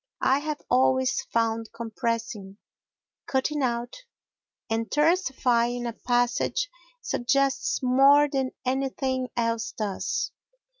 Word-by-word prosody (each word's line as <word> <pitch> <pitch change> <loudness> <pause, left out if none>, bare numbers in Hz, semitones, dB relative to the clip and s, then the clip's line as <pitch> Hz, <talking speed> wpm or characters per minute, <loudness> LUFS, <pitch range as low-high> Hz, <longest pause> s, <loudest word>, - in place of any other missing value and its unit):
I 265 +1 +4
have 300 0 -4
always 260 +1 +2
found 225 -1 0
compressing, 230 -3 -4 0.7
cutting 285 +3 0
out, 240 -1 -2 0.7
and 225 0 -2
tersifying 255 -7 +1
a 235 - -4
passage 245 - 0 0.3
suggests 275 +2 0
more 275 +3 +6
than 270 -2 -1 0.2
anything 260 0 -1
else 230 -1 0
does. 205 -3 -2
250 Hz, 95 wpm, -26 LUFS, 230-270 Hz, 0.7 s, more